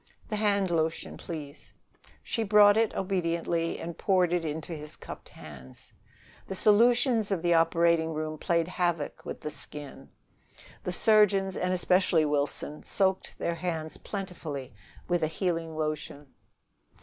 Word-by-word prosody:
"The 215 - -1
hand 200 -3 +2
lotion, 160 -1 -1
please." 150 -4 -8 0.5
She 230 - -2
brought 205 -1 +6
it 225 -1 +2
obediently 170 -3 -1
and 170 0 -5
poured 180 -3 +2
it 175 -1 +1
into 160 +2 -4
his 150 -1 -7
cupped - - -10
hands. 65 -4 -10 0.5
The 190 - -4
solutions 230 +2 +4
of 190 -4 -1
the 175 0 +3
operating 165 0 +3
room 155 0 -4
played 170 0 +1
havoc 175 -4 -1
with - - -6
the 150 - -4
skin: 150 -2 -6 0.7
the 180 - -2
surgeons, 195 -1 +4
and 180 0 -1
especially 180 -3 +3
Wilson, 145 0 -1
soaked 190 -1 0
their 170 - -1
hands 165 -2 -4
plentifully 160 - -6 0.3
with 175 -1 +1
a 155 - +2
healing 165 -1 -2
lotion. 150 -2 -4
170 Hz, 135 wpm, -28 LUFS, 155-190 Hz, 0.7 s, brought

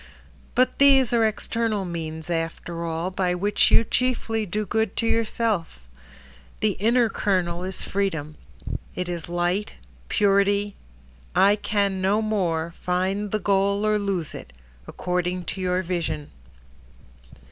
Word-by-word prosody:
But 255 +1 +2
these 270 -4 +6
are 230 -2 +4
external 215 -1 -1
means 160 -1 -5
after 165 0 -3
all 165 +2 -2
By 180 -1 0
which 205 +3 +2
you 225 - +6
chiefly 225 -2 0
do 210 +4 -2
good 220 +1 0
to 230 - -1
yourself. 225 - 0 0.8
The 215 -1 +3
inner 235 +2 +4
kernel 180 -4 0
is 190 0 -4
freedom, 165 -7 -2 0.6
It 180 - -3
is 170 -1 -5
light, 175 +4 -1 0.4
purity— 200 0 +2 0.6
I 200 +1 +6
can 200 -2 0
no 195 +3 +2
more, 170 -6 0
Find 190 +3 0
the 215 - 0
goal 200 +1 +1
or 215 0 +2
lose 195 -6 -2
it, 65 - -9 0.3
according 180 0 -2
to 190 - -6
your 180 0 0
vision. 170 -4 -3
195 Hz, 130 wpm, -24 LUFS, 175-215 Hz, 0.8 s, these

